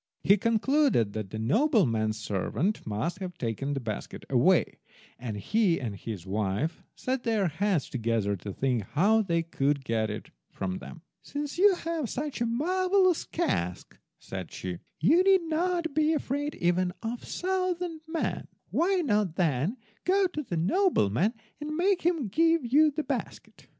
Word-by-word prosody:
He 200 - +6
concluded 230 - +2
that 110 -3 -4
the 110 - -6
nobleman's 115 - +2
servants 115 - -2
must 110 - -2
have 180 -3 -6
taken 130 +5 -2
the - - -1
basket 110 -5 -6
away, - - +3 0.4
and 115 -4 -4
he 195 - +2
and 115 -6 -4
his 100 -3 -7
wife 105 - -1
set 260 0 -2
their 220 -5 +1
heads 180 0 0
together 115 -4 0
to 100 +3 -7
think 125 +2 0
how 200 - +3
they 170 -5 0
could 140 -4 -1
get 110 -2 0
it 105 - -6 0.2
from 95 -1 -4
them. 170 -2 -11 0.2
"Since 290 +3 -5
you 400 0 +6
have 330 -7 -3
such 285 -2 -4
a 235 - +2
marvellous 365 +7 +2
cask," 90 - -2 0.2
said 95 -3 -7
she, 90 -2 -5 0.2
"you 300 - +5
need 380 -2 +5
not 335 0 -1
be 310 +1 +3
afraid 290 0 -2
even 180 +1 +1
of 230 +2 -3
a - - -12
thousand 360 -3 -2
men. 320 0 -2 0.2
Why 370 +2 +2
not 210 - +1
then 165 - 0 0.3
go 385 +2 +3
to 345 -4 -2
the 185 - -4
nobleman 195 - +2 0.2
and 305 +1 -4
make 375 +1 +2
him 330 -8 +1
give 330 - +2
you 300 +6 +5
the 300 +1 -3
basket." - - -5
210 Hz, 160 wpm, -28 LUFS, -, 0.4 s, He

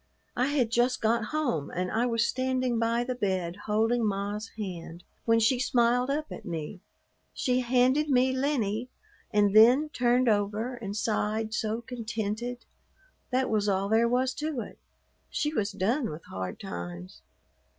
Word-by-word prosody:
I 250 +2 +2
had 270 -6 +1
just 245 +2 +2
got 230 0 +1
home, 245 - -1
and 180 +1 -3
I 235 +3 +1
was 230 -1 +1
standing 255 -2 0
by 230 +1 +1
the 255 +1 -2
bed 185 -7 -1
holding 225 +3 +2
ma's 205 +1 -2
hand, 175 -4 -6 0.2
when 230 0 +4
she 235 +3 +3
smiled 245 0 +2
up 305 +2 -2
at - - -7
me; 175 0 -5 0.5
she 250 -1 +1
handed 255 +4 +2
me 260 0 +3
Lennie 250 -4 -1 0.4
and 205 -1 +2
then 250 +8 +7
turned 250 -2 +2
over 215 +3 +1
and 215 -4 -5
sighed 215 0 -1
so 220 +1 -1
contented. 230 0 -4 0.6
That 260 0 +1
was 210 -1 +1
all 195 0 0
there 230 +2 +3
was 255 +1 +1
to 305 -5 -2
it. - - -10 0.5
She 300 0 -1
was 215 -6 0
done 225 +8 0
with 155 +1 -8
hard 95 -1 -5
times. 85 -2 -7
230 Hz, 155 wpm, -28 LUFS, 205-250 Hz, 0.6 s, then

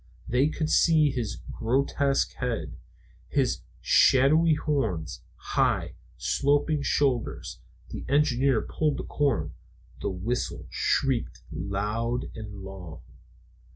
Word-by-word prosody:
They 125 +4 +3
could 155 0 -2
see 155 -4 +4
his 120 -5 -3 0.2
grotesque 135 +3 +1
head, 125 -3 -3 0.5
his - - +1 0.2
shadowy 155 +5 +5
horns, 115 - -2
high, - - 0 0.2
sloping 145 +2 +1
shoulders. 135 -4 0 0.3
The - - -6
engineer 135 -3 +3
pulled 155 -2 -1
the - - -4
cord. 145 -4 0 0.5
The - - -1
whistle 100 +7 -3
shrieked 135 -4 0
loud 105 +6 -2
and 105 -3 -8
long. 90 -5 -9
130 Hz, 100 wpm, -27 LUFS, 110-145 Hz, 0.5 s, shadowy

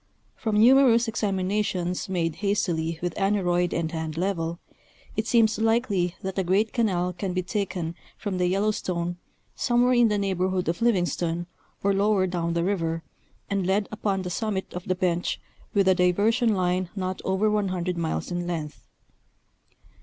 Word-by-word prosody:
From 215 -3 0
numerous 240 0 +6
examinations 195 -4 -1
made 165 -4 -1
hastily 170 -6 0
with 175 -2 -1
aneroid 180 -3 +1
and 165 -1 -1
hand 160 -1 -4
level, 170 -2 -1 0.6
it 215 +1 -1
seems 225 -2 +3
likely 220 -6 +1
that 190 0 -2
a - - +1
great 195 +5 +1
canal 180 -6 +1
can 180 +1 -3
be 185 0 -1
taken 185 -4 -2 0.2
from 195 -4 -3
the 180 - +2
Yellowstone, 180 -3 -1 0.4
somewhere 245 +1 +3
in 240 -1 +5
the 210 -1 +1
neighborhood 185 -2 0
of 170 +5 -1
Livingston, 175 -6 +1 0.4
or 200 0 +3
lower 200 -1 +3
down 170 -2 -2
the 170 - +1
river, 165 -4 -1 0.4
and 200 -2 -1
led 200 +2 +1
upon 200 -3 -1
the 180 - -4
summit 200 -1 -2
of 180 0 -6
the 185 - +1
bench 175 -1 0 0.4
with 200 -1 +4
a 190 - +7
diversion 210 +6 +2
line 180 -1 0
not 185 -1 -3
over 190 +3 +1
100 185 -4 0
miles 170 +1 -2
in 175 0 -2
length. 160 -4 -4
185 Hz, 155 wpm, -26 LUFS, 175-210 Hz, 0.6 s, a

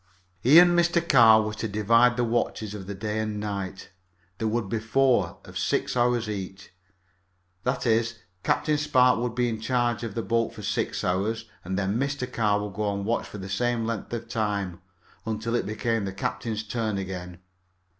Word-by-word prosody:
He 130 - +6
and 175 0 +8
Mr. 170 0 +2
Carr 115 -6 +7
were 110 0 -3
to 110 +1 -3
divide 115 +4 +3
the 125 - +2
watches 115 -2 -1
of 95 -3 -7
the 100 - -5
day 105 +2 -3
and 110 -1 -2
night. 100 -3 -5 0.5
There 110 - 0
would 110 -1 -1
be 110 +3 -1
four, 110 -5 +2
of - - -6
six - - 0
hours 120 -2 +2
each. 95 -2 -6 0.9
That 125 +1 -1
is, 115 0 +2 0.3
Captain 150 - +1
Spark 130 -5 +4
would 120 -1 -2
be 125 0 +1
in 110 -2 -3
charge 120 -1 0
of 115 -4 -5
the 115 - -2
boat 115 0 0
for 105 - -9
six 105 -1 -2
hours, 100 +5 -1 0.2
and 95 +2 -3
then 100 +3 0
Mr. 140 -1 -1
Carr 105 -5 0
would 105 -2 -6
go 105 +2 -2
on 100 -1 -2
watch 115 +2 -1
for - - -9
the 95 -1 -7
same 115 +4 0
length 115 -2 -4
of 120 -1 -4
time, 100 -5 -2 0.5
until 110 +1 -2
it 120 - 0
became 110 0 -1
the 95 - -4
captain's 110 +2 -3
turn 110 -1 -2
again. 90 -2 -6
110 Hz, 190 wpm, -26 LUFS, 100-120 Hz, 0.9 s, and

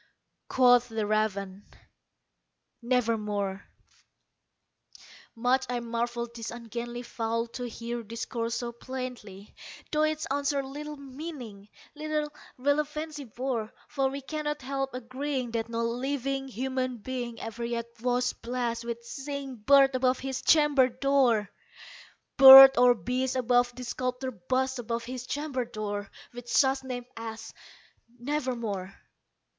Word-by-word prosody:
Quoth 245 -1 +5
the 220 -1 -2
raven, 205 -2 -1 1.2
"Nevermore." 210 -5 -1 1.7
Much 250 +3 +1
I 245 -1 -1
marvelled 235 0 -3
this 230 -1 -5
ungainly 240 +1 -6
fowl 230 -1 -2
to 245 +1 -5
hear 235 +1 -5
discourse 230 +1 -4
so 240 -1 -3
plainly, 235 -5 -8 0.4
Though 305 - +1
its 310 0 0
answer 280 0 0
little 295 +2 -7
meaning 265 -7 -9 0.2
little 305 -1 -3 0.2
relevancy 300 +2 -1
bore; 235 -2 -3 0.2
For 270 -1 0
we 275 +1 -5
cannot 295 0 -4
help 270 0 -3
agreeing 255 0 -3
that 230 0 -2
no 230 0 -2
living 270 +3 -2
human 255 0 -2
being 240 0 -5
Ever 225 +1 -6
yet 235 0 -2 0.2
was 245 0 +1
blessed 235 -1 -3
with 235 0 -5
seeing 275 0 -6
bird 275 +4 +5
above 255 0 +2
his 265 -1 -4
chamber 295 -4 +5
door 255 -5 +2 0.9
Bird 270 0 +12
or 245 0 +6
beast 255 +2 -2
above 245 -1 +3
the 255 - -7
sculptured 250 -5 -4
bust 260 0 0
above 235 0 -3
his 250 +1 -6
chamber 285 -3 -2
door, 205 -3 -5 0.2
With 240 0 -9
such 265 +3 +3
name 250 -2 -5
as 225 0 -7 0.6
"Nevermore." 235 -8 -3
250 Hz, 120 wpm, -28 LUFS, 230-270 Hz, 1.7 s, Bird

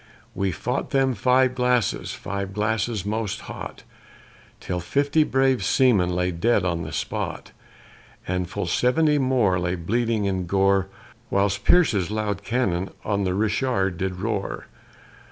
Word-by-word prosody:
We 95 -1 -1
fought 125 - -3
them 135 -1 +2
five 125 +4 +3
glasses, 125 -2 0
five 100 0 -5
glasses 105 0 -1
most 105 -1 -2
hot, - - -8 0.8
Till 90 - -3
fifty 140 - +2
brave 135 -6 +2
seamen 100 -4 +3
lay 90 0 0
dead 95 +3 +1
on 85 -2 -1
the - - -6
spot, - - -4 0.8
And 90 -1 -2
full 90 - -3
seventy 145 - +2
more 125 -9 +2
lay 90 +1 -1
bleeding 110 +4 0
in 95 -1 0
their 90 -1 -4
gore, 95 +1 +2 0.4
Whilst 100 0 +1
Pierce's 110 - +4
loud 105 -2 -2
cannon 100 -5 -1 0.2
on 100 -2 0
the 90 0 0
Richard 105 -3 0
did 95 -1 -2
roar. 105 -2 -3
105 Hz, 140 wpm, -24 LUFS, 95-125 Hz, 0.8 s, Pierce's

